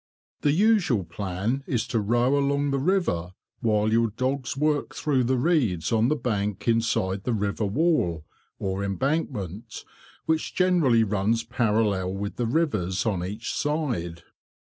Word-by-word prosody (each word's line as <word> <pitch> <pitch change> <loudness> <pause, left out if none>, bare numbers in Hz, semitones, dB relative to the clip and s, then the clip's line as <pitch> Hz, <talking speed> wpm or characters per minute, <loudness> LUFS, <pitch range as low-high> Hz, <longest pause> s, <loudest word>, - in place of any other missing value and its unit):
The 145 - +3
usual 175 - +3
plan 100 +9 -3
is 120 -4 0
to 115 - +1
row 120 +6 +2
along 140 0 +1
the 135 - 0
river 135 - 0 0.3
while 110 -2 +1
your 115 0 +3
dogs 130 +4 -2
work 150 0 0
through 135 -5 +1
the 130 +2 +1
reeds 120 - +1
on 115 0 +3
the 150 - +2
bank 105 -7 -2
inside 105 -4 +1
the 125 - -1
river 105 0 -1
wall, 100 - +1 0.3
or 95 0 -2
embankment, 110 - -3 0.4
which 160 0 -1
generally 170 -11 +3
runs 105 +2 0
parallel 105 -6 0
with 100 +1 -5
the 120 -2 0
rivers 105 - 0
on 95 -6 0
each 105 +5 -4
side. 120 - -2
115 Hz, 145 wpm, -25 LUFS, 100-140 Hz, 0.4 s, The